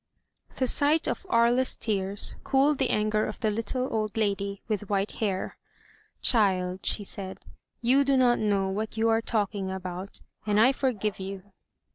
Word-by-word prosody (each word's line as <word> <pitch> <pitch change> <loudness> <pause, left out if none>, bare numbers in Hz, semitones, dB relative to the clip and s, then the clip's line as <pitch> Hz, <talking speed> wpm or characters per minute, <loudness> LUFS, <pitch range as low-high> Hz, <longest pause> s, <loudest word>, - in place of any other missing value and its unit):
The 260 - +1
sight 295 +5 +3
of 390 - -3
Aria's 240 +2 +3
tears 200 -2 -2
cooled 275 +1 +2
the 265 - +2
anger 215 0 +1
of 215 - -6
the 220 -3 +1
little 230 +4 -2
old 215 -1 -2
lady 200 -2 -1
with 210 -2 -3
white 200 0 0
hair. 195 -4 -2 0.7
Child," 190 -5 +2
she 210 - 0
said, 190 -1 -6 0.4
"you 265 +4 +4
do 275 -1 +2
not 245 -2 +4
know 200 -2 +1
what 215 +3 -3
you 225 +1 +2
are 225 0 +3
talking 205 -4 -1
about, 185 0 -6 0.2
and 210 -1 +1
I 245 +4 +6
forgive 220 -7 -1
you. 195 +1 -7
215 Hz, 160 wpm, -27 LUFS, 195-240 Hz, 0.7 s, I